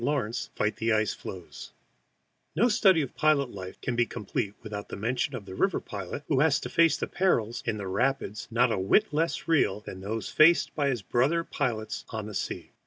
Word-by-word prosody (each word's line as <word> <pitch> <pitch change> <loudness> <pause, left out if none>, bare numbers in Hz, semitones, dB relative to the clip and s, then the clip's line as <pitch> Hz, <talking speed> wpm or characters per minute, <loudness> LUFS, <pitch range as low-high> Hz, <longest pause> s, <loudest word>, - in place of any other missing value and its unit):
LAWRENCE 125 -2 -1
FIGHT 105 - 0
THE 115 0 +1
ICE 110 -1 +1
FLOES 90 -3 -9 0.8
NO 230 +9 +4
study 190 -8 +4
of 135 - -7
pilot 150 -5 +2
life 95 -2 -8
can 125 - -2
be 120 0 +2
complete 105 -2 -3
without 105 -2 -6
mention 125 +6 -1
of 110 -5 -7
the 95 - -9
river 190 - +1
pilot 100 +7 -6
who 140 -4 +2
has 150 0 +4
to - - -5
face 165 -3 +4
perils 120 - +1
in 110 -2 0
the 100 - -5
rapids 105 +1 -1
not 120 +1 +3
a 100 - 0
whit 150 - +3
less 165 +3 -1
real 160 -9 +2
than 95 -3 -9
those 110 +3 -3
faced 165 +3 +5
by 145 -2 0
his 120 -7 -2
brother 140 - +1
pilot 115 -9 -3
on 110 -2 -4
the 105 - -7
sea. - - -4
120 Hz, 195 wpm, -28 LUFS, 105-150 Hz, 0.8 s, faced